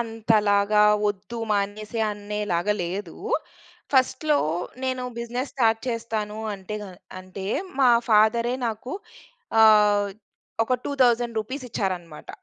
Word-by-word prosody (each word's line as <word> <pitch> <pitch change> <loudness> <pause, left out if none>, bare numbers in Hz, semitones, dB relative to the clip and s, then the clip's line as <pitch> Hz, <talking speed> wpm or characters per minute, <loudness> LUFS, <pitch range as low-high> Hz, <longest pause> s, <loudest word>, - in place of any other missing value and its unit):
అంతలాగా 210 -2 +2 0.2
వొద్దూ, 205 +3 -3
మానేసే 210 +2 -1
అనేలాగా 205 -2 -1
లేదూ. 180 +1 -5 0.8
ఫస్ట్‌‌లో 280 +3 +3 0.5
నేను 255 -1 -1 0.2
బిజినెస్ 240 +3 -3
స్టార్ట్ 225 -4 +2
చేస్తాను 220 -3 -3 0.2
అంటేగ 205 +2 -6 0.4
అంటే 185 +1 -9 0.4
మా 260 - +6 0.2
ఫాదరే 225 +3 +4
నాకు 225 +4 -6 0.7
ఆహ్, 210 -2 +6 0.5
ఒక 255 +3 +1
2000 245 -4 +2
రూపీస్ 255 +5 -5
ఇచ్చారన్నమాట. 180 -7 -4
215 Hz, 95 wpm, -24 LUFS, 205-235 Hz, 0.8 s, మా